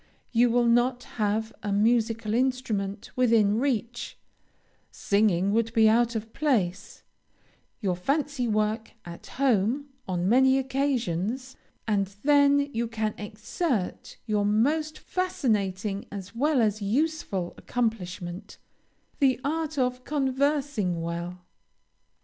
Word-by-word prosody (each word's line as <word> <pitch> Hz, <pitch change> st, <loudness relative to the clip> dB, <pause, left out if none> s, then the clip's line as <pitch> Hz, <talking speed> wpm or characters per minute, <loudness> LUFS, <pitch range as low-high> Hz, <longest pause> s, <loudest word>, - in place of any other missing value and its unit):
You 240 Hz, 0 st, +4 dB
will 240 Hz, +1 st, +3 dB
not 240 Hz, +1 st, +2 dB
have 220 Hz, 0 st, -2 dB
a 205 Hz, -, -3 dB
musical 225 Hz, +1 st, +1 dB
instrument 225 Hz, -6 st, -1 dB
within 225 Hz, -4 st, +3 dB
reach, 240 Hz, -3 st, -2 dB, 0.7 s
singing 200 Hz, -2 st, +1 dB
would 230 Hz, 0 st, +1 dB
be 220 Hz, -2 st, +5 dB
out 235 Hz, +2 st, +3 dB
of 220 Hz, 0 st, -5 dB
place, 200 Hz, -11 st, -1 dB, 0.8 s
your 190 Hz, -4 st, 0 dB
fancy 275 Hz, -, -1 dB
work 215 Hz, +1 st, -1 dB
at 170 Hz, -1 st, -10 dB
home, 260 Hz, +2 st, +1 dB, 0.2 s
on 180 Hz, -1 st, -1 dB
many 260 Hz, +4 st, +5 dB
occasions, 260 Hz, -3 st, -1 dB, 0.3 s
and 200 Hz, -3 st, +1 dB, 0.2 s
then 285 Hz, 0 st, +4 dB
you 235 Hz, +1 st, -1 dB
can 220 Hz, -2 st, -2 dB
exert 210 Hz, -, -3 dB
your 210 Hz, -2 st, +1 dB
most 295 Hz, +10 st, +1 dB
fascinating 210 Hz, -, -1 dB
as 195 Hz, 0 st, -7 dB
well 275 Hz, +2 st, +2 dB
as 215 Hz, 0 st, 0 dB
useful 205 Hz, -, -1 dB
accomplishment, 190 Hz, -5 st, -4 dB, 0.6 s
the 265 Hz, -3 st, +3 dB
art 315 Hz, +1 st, -2 dB
of 250 Hz, -1 st, 0 dB
conversing 270 Hz, -, 0 dB
well. 170 Hz, +2 st, -5 dB
230 Hz, 110 wpm, -27 LUFS, 205-265 Hz, 0.8 s, be